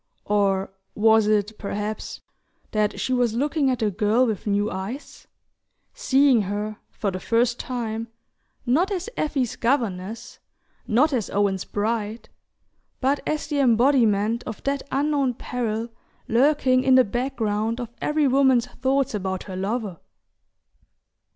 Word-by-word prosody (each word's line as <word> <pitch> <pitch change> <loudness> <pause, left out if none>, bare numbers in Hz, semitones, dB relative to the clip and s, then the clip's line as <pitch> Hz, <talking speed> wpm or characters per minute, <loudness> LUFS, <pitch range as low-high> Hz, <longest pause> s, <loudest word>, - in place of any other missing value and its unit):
Or 195 -2 +1 0.2
was 220 0 +4
it, 210 0 0
perhaps, 210 +1 -4 0.5
that 210 -1 0
she 260 - -1
was 245 -3 +1
looking 285 +2 +1
at 255 - +1
the 220 -3 0
girl 215 +5 +2
with 220 -3 -3
new 205 +1 +1
eyes: 195 +9 -7 0.7
seeing 275 - +3
her, 205 +2 -3
for 200 - -3
the 185 - -5
first 235 +4 +1
time, 230 -3 -4 0.6
not 315 - +2
as 390 +4 -3
Effie's 270 - -1
governess, 225 -5 -2 0.5
not 275 +7 +3
as 235 -6 -1
Owen's 195 -2 0
bride, 215 +1 -3 0.7
but 275 +2 +1
as 305 -1 -1
the 295 -1 -2
embodiment 235 -3 +3
of 220 - -7
that 280 0 -1
unknown 280 -3 +1
peril 230 -2 -3 0.4
lurking 255 +1 +3
in 265 -1 +5
the 255 - +7
background 230 -1 -1
of 240 -2 -5
every 300 -1 +2
woman's 260 -2 +4
thoughts 260 +1 -1
about 190 -2 -3
her 190 - -7
lover? 200 -1 -3
230 Hz, 130 wpm, -24 LUFS, 210-265 Hz, 0.7 s, the